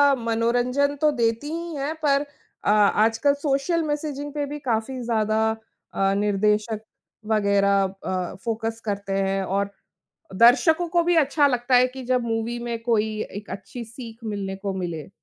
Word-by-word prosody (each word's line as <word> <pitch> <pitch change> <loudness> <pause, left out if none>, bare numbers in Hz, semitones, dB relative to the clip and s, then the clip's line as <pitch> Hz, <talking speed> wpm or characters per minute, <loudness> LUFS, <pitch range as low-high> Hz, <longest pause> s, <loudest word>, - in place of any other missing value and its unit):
मनोरंजन 245 +4 +1
तो 305 - +5
देती 230 +1 0
ही 335 0 -4
हैं 285 +3 -2
पर 280 -1 +3 0.4
अ, - - +2
आजकल 220 +6 +3
सोशल 285 +4 0
मेसेजिंग 295 -1 -3
पे 290 -1 -1
भी 295 +1 -6
काफ़ी 250 0 -2
ज़्यादा 220 -2 +1 0.5
अ, 195 0 +2
निर्देशक 210 +2 +1 0.5
वगैरह 200 -2 +3
अ, 185 -2 -3
फ़ोकस 225 0 -2
करते 200 -1 -3
हैं, 195 0 0
और 200 +1 -1 0.7
दर्शकों 275 - +5
को 345 0 +2
भी 350 +1 +3
अच्छा 290 -1 +4
लगता 250 -1 +1
है 250 +1 +6
कि 260 +1 -9
जब 250 0 +1
मूवी 230 +1 -2
में 235 -1 -3
कोई 220 -2 0
एक 205 +1 -8
अच्छी 235 +4 -7
सीख 230 0 -10
मिलने 200 -3 -3
को 195 0 -4
मिले। 170 -4 -4
230 Hz, 155 wpm, -24 LUFS, 205-280 Hz, 0.7 s, है